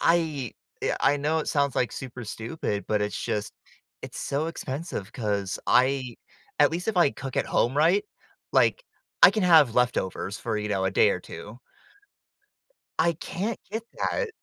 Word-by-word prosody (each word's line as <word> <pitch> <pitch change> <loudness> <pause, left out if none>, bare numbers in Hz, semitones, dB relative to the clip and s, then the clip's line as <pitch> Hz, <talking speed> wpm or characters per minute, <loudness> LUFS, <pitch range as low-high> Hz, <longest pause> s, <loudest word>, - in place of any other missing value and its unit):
I 155 -8 +1 0.3
uh, - - +1
I 145 - +4
know 150 +3 0
it - - -3
sounds 140 -2 +1
like 125 - +1
super 125 -3 -7
stupid, 115 -1 -4
but 105 -1 +1
it's 105 - -2
just 105 -1 -2 0.5
it's - - -7
so 145 +3 -1
expensive 140 - -5
'cause 100 -5 -2
I 130 -1 +2 0.4
at - - +6
least 175 +5 -3
if 210 - 0
I 170 -5 +5
cook 135 -2 -7
at - - +1
home, 125 +4 +1
right, 170 +7 +4 0.5
like, - - +3 0.4
I - - +11
can 210 0 -1
have 160 -9 +6
leftovers 110 -5 0
for, 110 -2 -2
you 105 0 -2
know, 95 -2 0
a 95 - +1
day - - +4
or - - -2
2. 110 +4 -10 1.4
I 170 - +4
can't 190 +7 -4
get 220 +1 -3 0.2
that. 485 - 0
135 Hz, 170 wpm, -26 LUFS, 110-165 Hz, 1.4 s, I